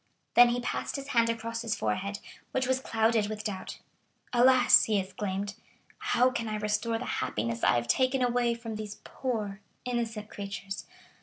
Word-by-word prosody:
Then 245 0 +8
he 240 +1 0
passed - - -3
his 275 0 -5
hand 230 -3 +3
across 230 0 -3
his 230 -2 -1
forehead, 190 - -2 0.4
which 260 0 +1
was 260 0 +1
clouded 225 -3 +1
with 215 0 -5
doubt. 200 -3 -5 0.6
"Alas," 250 +1 +6
he 215 -2 +1
exclaimed, 195 +1 -3 0.5
"how 415 -12 +3
can 235 -2 -3
I 215 - -2
restore 210 +2 0
the 250 - -5
happiness 115 +2 -2
I - - +5
have 120 0 0
taken 255 - +2
away 240 -1 +2
from 230 -2 -6
these 210 -1 -6
poor 215 -6 -3 0.3
innocent 230 -4 -2
creatures? 200 -1 -6
225 Hz, 165 wpm, -29 LUFS, 205-245 Hz, 0.6 s, Then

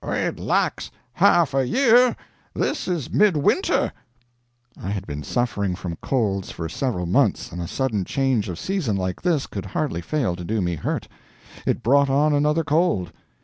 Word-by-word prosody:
"It - - -2
lacks - - 0 0.2
half 170 -3 +4
a 135 -1 +2
year. 250 - +4 0.4
This - - -1
is 170 -7 -2
mid 205 -6 +4
winter." 330 - +1 0.9
I 95 - -4
had 100 -2 -3
been 75 -1 -5
suffering 100 - -1
from 90 -2 -5
colds 100 -7 -1
for 80 - -5
several 90 - -2
months, 85 - +1
and 85 - -5
a 85 - -4
sudden 115 -5 -1
change 125 -2 0
of 85 - -5
season, 180 - -1
like 90 -1 -3
this, 170 -6 +1
could 100 -1 -6
hardly 105 - -2
fail 120 - -1
to 90 - -7
do 110 +5 -1
me 90 -2 0
hurt. 80 - -3 0.6
It - - 0
brought 140 +3 +4
on 145 +3 +3
another 150 +3 +2
cold. 150 - +1
125 Hz, 170 wpm, -23 LUFS, 90-155 Hz, 0.9 s, half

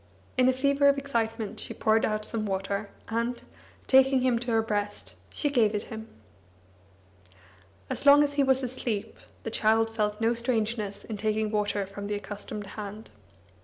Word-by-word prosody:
In 255 0 +5
a - - +6
fever 280 +2 +3
of 280 - +3
excitement, 225 -6 -2
she - - -7
poured 220 0 +3
out 215 0 -1
some 215 -2 -3
water, 200 +1 -2 0.2
and, 235 +2 -1 0.5
taking 265 0 +5
him 250 -2 +2
to 245 +1 -5
her 225 -1 +3
breast, 205 -1 -3 0.2
she 295 - -1
gave 225 -6 +3
it 210 - -1
him. 220 0 -7 1.8
As - - -3
long 285 +1 +8
as 285 -1 0
he 285 - +2
was 265 -1 +3
asleep, 240 -4 -3 0.2
the 225 - -4
child 225 +1 +2
felt 210 -1 0
no 230 +1 +2
strangeness 225 -4 -2
in 220 - -6
taking 215 0 0
water 205 -1 0
from 200 +1 -7
the 205 - -1
accustomed 205 0 -5 0.2
hand. 210 +2 -8
225 Hz, 165 wpm, -28 LUFS, 210-255 Hz, 1.8 s, long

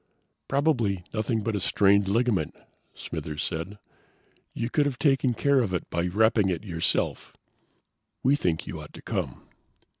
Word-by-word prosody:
"Probably 120 - +1
nothing 110 +1 0
but 110 +1 -1
a - - 0
strained 100 +1 +3
ligament," 105 -5 +1 0.4
Smithers 75 -1 -5
said. 90 +5 -4 0.7
"You 115 - -3
could 145 -2 +3
have 135 -3 -3
taken 135 -4 +2
care 140 +2 +3
of 100 -7 0
it 85 - -3
by 85 +1 0
wrapping 105 +1 +3
it 90 0 -2
yourself." 85 -5 -2 0.9
"We 135 +3 +5
think 85 - -1
you 80 - -6
ought 75 - -12
to - - -12
come." - - -3
105 Hz, 150 wpm, -27 LUFS, 90-125 Hz, 0.9 s, We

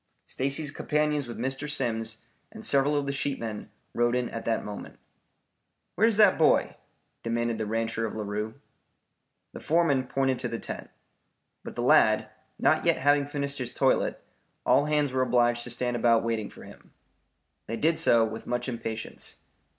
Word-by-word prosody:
Stacy's 140 +2 -1
companions 150 -2 0
with 120 - -7
Mr. 135 +4 -3
Simms 115 -6 -2 0.3
and - - -8
several 140 +2 +2
of 145 - 0
the 140 - -1
sheepmen 115 -6 -3 0.2
rode 120 +1 +2
in 125 -1 -1
at 115 - -6
that 115 -1 0
moment. 105 -1 -8 1.0
"Where's 220 +1 +3
that 210 -5 +6
boy?" 160 - +3 0.5
demanded 115 0 -1
the 110 - -2
rancher 115 +1 -1
of - - -7
Larue. 105 +1 -3 1.0
The - - -7
foreman 150 -6 +2
pointed 135 -1 0
to - - -2
the 115 - -4
tent. - - -7 0.7
But - - -8
the - - -2
lad - - +4 0.3
not - - +3
yet - - +3
having 145 +1 +3
finished 140 -1 -3
his 125 -1 -4
toilet, 135 - +2 0.5
all 145 - +4
hands 150 -2 +1
were 130 0 0
obliged 120 -1 +2
to - - -6
stand 120 +1 -1
about 115 -1 +3
waiting 115 -2 -2
for - - -13
him. - - -15 0.7
They 115 - -3
did 160 +4 +1
so 115 -1 +5
with 110 0 -7
much 120 +1 -2
impatience. 115 -2 -5
125 Hz, 165 wpm, -27 LUFS, 115-145 Hz, 1.0 s, that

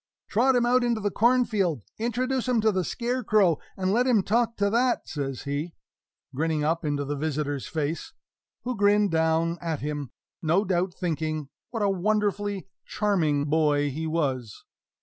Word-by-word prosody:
"Trot 255 +5 +3
him 240 -1 +3
out 250 +1 +3
into 235 -2 +1
the 205 -1 -1
cornfield, 215 - +2 0.2
introduce 250 +3 -1
him 250 -2 +2
to 220 0 +3
the 185 -2 0
scarecrow, 215 - +1 0.2
and 190 0 0
let 245 +3 +3
him 225 -6 +4
talk 230 +3 +1
to 200 - +2
that," 245 +2 +1
says 135 -4 -4
he, 145 +4 -3 0.6
grinning 155 +2 0
up 165 +3 0
into 145 -2 -1
the 145 +1 -2
visitor's 145 -2 -2
face, 155 +1 -3 0.5
who 250 0 -2
grinned 205 -1 +3
down 160 +1 +1
at 165 -3 -3
him, 145 -2 -3 0.3
no 175 +6 +2
doubt 180 0 0
thinking 155 -4 -2 0.2
what 225 -3 -2
a - - +3
wonderfully 205 0 0 0.2
charming 160 -9 +1
boy 145 -2 +2
he 160 +4 -3
was! 135 -9 -2
180 Hz, 160 wpm, -26 LUFS, 150-220 Hz, 0.6 s, him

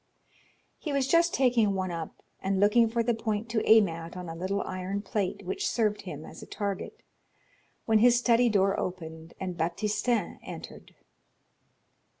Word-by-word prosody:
He 305 - -4
was 275 -2 +1
just 335 +3 +4
taking 235 -6 +3
one 185 -1 -2
up 165 -2 -6 0.2
and 190 0 0
looking 220 +3 +5
for 230 +1 0
the 240 +1 +1
point 220 0 -2
to 220 0 0
aim 220 -2 +7
at 165 +1 -7
on 180 -1 -6
a 165 - -6
little 190 +4 -2
iron 185 +2 -4
plate 200 0 -2
which 185 - -1
served 215 -3 0
him 155 -6 -8
as - - -11
a - - -10
target, 200 -2 -4 0.8
when 220 -1 +4
his 240 +2 +6
study 240 0 +4
door 195 -2 +2
opened, 160 -2 -6
and 185 -2 -4
Baptistin 210 +5 -1
entered. - - -10
205 Hz, 160 wpm, -28 LUFS, 185-230 Hz, 0.8 s, aim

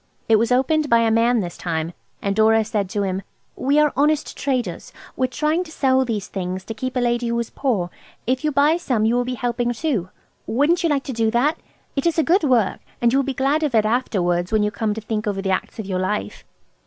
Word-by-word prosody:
It 225 - +5
was 230 +3 +1
opened 295 +4 +2
by 235 0 +5
a 225 -1 +2
man 230 +1 +3
this 175 -2 -5
time, 165 -1 -3 0.3
and 200 0 0
Dora 220 0 +4
said 210 -3 -2
to 205 +1 -1
him– 190 0 -2 0.3
"We 280 +3 +1
are 300 -1 +4
honest 295 +2 +1
traders. 250 -10 -2 0.2
We 260 - +1
are - - -21
trying 305 +6 0
to 315 - -12
sell 265 -3 +2
these 215 -5 -3
things 185 -1 -4
to 225 - -5
keep 255 +4 -5
a - - +2
lady 240 0 0
who 235 0 0
is 235 - -4
poor. 205 -11 -1 0.3
If 255 +4 0
you 305 - +1
buy 290 +4 +3
some 250 -11 0
you 225 - +2
will 245 0 +1
be 250 0 -3
helping 240 0 -1
too. 235 - -2 0.4
Wouldn't 295 +9 +2
you 335 - +1
like 280 -2 +1
to 265 - -5
do 225 -1 +1
that? 270 +8 +1 0.4
It 275 +3 0
is 335 - 0
a 320 - +4
good 350 +3 +3
work, 245 -8 +2 0.2
and 235 0 +2
you 270 - +4
will - - +2
be 270 -1 -3
glad 280 +3 +1
of 295 -6 0
it 215 -1 +4
afterwards, 180 -7 0
when 215 -1 +3
you 210 - 0
come 210 +1 -1
to 220 - -5
think 215 0 -3
over 200 -2 -1
the 195 0 -1
acts 185 - -2
of 220 - -5
your 185 -1 -2
life." 105 - -3
235 Hz, 250 wpm, -22 LUFS, 210-275 Hz, 0.4 s, It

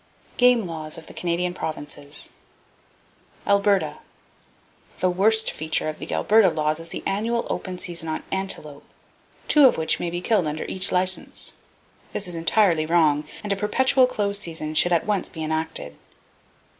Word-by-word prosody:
Game 245 -3 +4
Laws 155 -2 -5
Of 165 - -10
The - - -11
Canadian 175 +1 -2
Provinces 145 -3 -6 1.1
Alberta. 200 -6 +2 1.0
—The 185 - +2
worst 220 +4 +3
feature 155 0 -1
of 155 - -7
the - - -7
Alberta 215 -2 +4
laws 155 -1 -1
is 165 0 -6
the - - -6
annual 230 +4 -1
open 185 -1 -4
season 170 -3 -3
on 155 - -3
antelope, 155 -7 -3 0.6
two 295 -3 +7
of - - +1
which 160 0 +1
may 175 - -2
be 175 +1 -3
killed 185 -2 +1
under 150 +1 -3
each 185 - +2
license. 185 0 +1 0.6
This 195 - -2
is 175 - -2
entirely 165 -1 +2
wrong, 155 -3 +2 0.2
and 205 -1 0
a - - -2
perpetual 255 +6 +3
close 200 -4 -1
season 160 -5 -4
should 175 +3 +3
at 170 -2 +2
once 205 -3 -1
be 160 -2 -7
enacted. 160 +1 -3
175 Hz, 155 wpm, -23 LUFS, 160-205 Hz, 1.1 s, two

